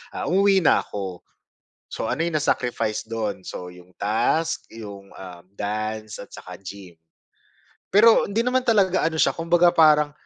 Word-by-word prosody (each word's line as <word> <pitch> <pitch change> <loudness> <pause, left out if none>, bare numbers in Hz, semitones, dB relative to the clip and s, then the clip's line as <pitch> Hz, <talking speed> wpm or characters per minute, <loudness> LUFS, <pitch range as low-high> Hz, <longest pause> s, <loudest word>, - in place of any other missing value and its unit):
ah, - - -4
umuwi 195 0 +3
na - - +4
ako. 95 -3 -6 0.7
So, 110 - -4
ano 130 - -2
yung 170 - -3
na 150 - -1
sacrifice 110 -3 -1
dun? 110 -4 -4
So, 90 0 -7
yung 90 0 -17
task, 115 +10 0
yung, 100 -3 -10
ah, 90 -2 -10 0.2
dance 110 +1 -4
at - - -10
saka 90 -1 -10
gym. 95 -3 -11 0.9
Pero 220 +3 +5
hindi 225 +3 0
naman 255 +1 +2
talaga 195 -8 +2
ano 160 - -7
siya, - - +3
kumbaga 175 +1 +3
parang 150 -2 +5
115 Hz, 160 wpm, -23 LUFS, -, 0.9 s, Pero